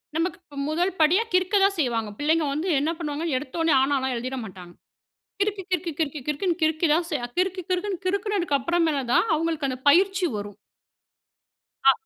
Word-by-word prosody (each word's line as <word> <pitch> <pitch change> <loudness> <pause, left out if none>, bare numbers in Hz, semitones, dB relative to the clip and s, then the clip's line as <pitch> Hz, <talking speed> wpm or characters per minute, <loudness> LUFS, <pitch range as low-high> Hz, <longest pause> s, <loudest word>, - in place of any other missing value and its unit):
நமக்கு 335 +3 -1 0.2
ம் 280 - -2
முதல் 350 +5 +1
படியா 335 +8 +4
கிறுக்க 370 +3 +2
தான் 395 0 +3
செய்வாங்க. 230 -6 0
பிள்ளைங்க 310 +2 +2
வந்து 310 +6 -2
என்ன 295 +3 0
பண்ணுவாங்க? 310 -1 -3
எடுத்தொன்னே, 310 +4 0
ஆனால்லாம் 265 -1 +1
எழுதிற 255 +3 -4
மாட்டாங்க. 180 -4 -10 0.7
கிறுக்கு, 405 -1 0
கிறுக்கு, 350 -1 -1
கிறுக்கு, 305 -2 -1
கிறுக்குன்னு 335 +4 -1
கிறுக்கி 315 +1 +2
தான் 335 +2 +1
ச - - -14 0.3
கிறுக்கு 370 0 0
கிறுக்குன்னு 370 0 -2
கிறுக்குனதுக்கு 385 -5 0
அப்புறமேல 330 0 +1
தான் - - +4
அவுங்களுக்கு 315 -2 -1
அந்த 255 -1 -4
பயிற்சி 380 +4 +4
வரும். 205 -1 -7 1.3
ஆ. 270 - +8
325 Hz, 160 wpm, -25 LUFS, 280-365 Hz, 1.3 s, ஆ